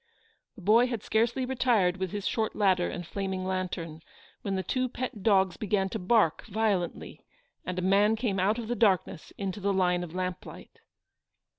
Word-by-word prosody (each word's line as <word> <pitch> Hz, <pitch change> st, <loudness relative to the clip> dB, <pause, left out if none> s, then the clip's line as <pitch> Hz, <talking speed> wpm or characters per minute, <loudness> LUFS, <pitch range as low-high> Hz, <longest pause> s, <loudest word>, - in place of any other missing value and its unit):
The 205 Hz, -, -13 dB
boy 225 Hz, +6 st, +5 dB
had 235 Hz, -4 st, -4 dB
scarcely 235 Hz, +4 st, +1 dB
retired 235 Hz, -8 st, +2 dB
with 190 Hz, -1 st, -2 dB
his 205 Hz, +2 st, -5 dB
short 220 Hz, -1 st, -1 dB
ladder 185 Hz, -4 st, +2 dB
and 175 Hz, -1 st, -6 dB
flaming 190 Hz, 0 st, -3 dB
lantern, 180 Hz, -4 st, -3 dB, 0.4 s
when 195 Hz, -1 st, -2 dB
the 190 Hz, -, -2 dB
two 255 Hz, +7 st, -1 dB
pet 245 Hz, -4 st, -5 dB
dogs 190 Hz, -3 st, +3 dB
began 195 Hz, -2 st, 0 dB
to -, -, -4 dB
bark 185 Hz, -4 st, +2 dB
violently, 205 Hz, -4 st, -2 dB, 0.4 s
and 185 Hz, 0 st, -3 dB
a 180 Hz, -, -1 dB
man 200 Hz, +3 st, +4 dB
came 215 Hz, -4 st, -1 dB
out 205 Hz, +5 st, +2 dB
of 235 Hz, -2 st, -5 dB
the 240 Hz, -, -1 dB
darkness 195 Hz, -8 st, +1 dB
into 195 Hz, 0 st, -4 dB
the 200 Hz, 0 st, 0 dB
line 180 Hz, -2 st, +1 dB
of 175 Hz, 0 st, -8 dB
lamplight. 185 Hz, -1 st, -6 dB
195 Hz, 175 wpm, -28 LUFS, 185-220 Hz, 0.4 s, boy